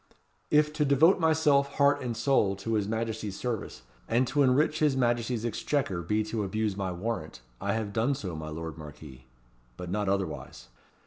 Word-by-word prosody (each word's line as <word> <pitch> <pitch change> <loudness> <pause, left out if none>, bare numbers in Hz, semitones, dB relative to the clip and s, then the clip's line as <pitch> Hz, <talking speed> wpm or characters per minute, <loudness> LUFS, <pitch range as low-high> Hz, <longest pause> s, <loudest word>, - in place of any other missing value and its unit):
"If 150 0 +3
to 155 -1 +1
devote 150 +7 +5
myself, 150 -4 +3
heart 140 -1 +3
and 120 -3 -3
soul, 115 -5 +2
to 100 +4 -4
his 105 -2 +1
Majesty's 110 -2 -3
service, 110 - -4 0.2
and 120 +3 +2
to 145 - +2
enrich 145 +4 +3
his 150 -3 +2
Majesty's 120 -2 0
exchequer 120 -5 -1
be 105 +6 0
to 110 0 -3
abuse 105 +1 -1
my 95 -2 -2
warrant, 105 - -4 0.2
I 100 0 0
have 110 -2 -3
done 115 +6 +1
so, 95 -9 -5
my 80 0 -6
lord 80 +1 -6
Marquis, 75 -4 -11 0.5
but 90 -1 -6
not 105 0 0
otherwise. 95 -10 -3
110 Hz, 175 wpm, -28 LUFS, 95-140 Hz, 0.5 s, devote